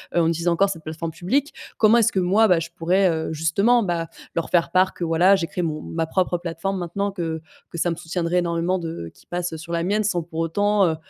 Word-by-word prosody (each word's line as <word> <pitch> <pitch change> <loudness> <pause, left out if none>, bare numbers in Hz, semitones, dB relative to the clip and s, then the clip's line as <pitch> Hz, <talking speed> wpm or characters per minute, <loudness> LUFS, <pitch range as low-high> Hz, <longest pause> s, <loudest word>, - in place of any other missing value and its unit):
heu, 170 - +4
on 165 - +2
utilise 165 +1 -1
encore 175 +4 +3
cette 165 -4 -6
plateforme 160 +1 -5
publique? 265 - -1 0.3
Comment 220 +1 +6
est-ce 225 - +3
que 190 - 0
moi, 195 +5 +4
bah, 180 -4 +4
je 165 +1 -5
pourrais, 185 +3 +2
heu, 160 -1 -2
justement, 200 +10 +3
bah, 170 -3 -2 0.3
leur 165 - -2
faire 170 -1 +2
part 185 +1 +3
que - - -6
voilà, 170 +4 +4
j'ai 175 -4 -2
créé 180 - -4
mon 155 -2 -2
ma 165 0 -2
propre 180 0 0
plateforme, 175 +3 -3
maintenant 200 +4 -2
que 165 -4 -4 0.3
que - - -6
ça 175 - +1
me - - -2
soutiendrait 170 +1 -2
énormément 170 +1 0
de 165 - -6
qu'ils - - -23
passent 175 -1 -3
sur 170 +2 -9
la 170 - 0
mienne 205 +4 +1
sans 195 -4 0
pour 160 0 -10
autant, 205 +4 +2
heu 160 - 0
175 Hz, 245 wpm, -23 LUFS, 165-190 Hz, 0.3 s, Comment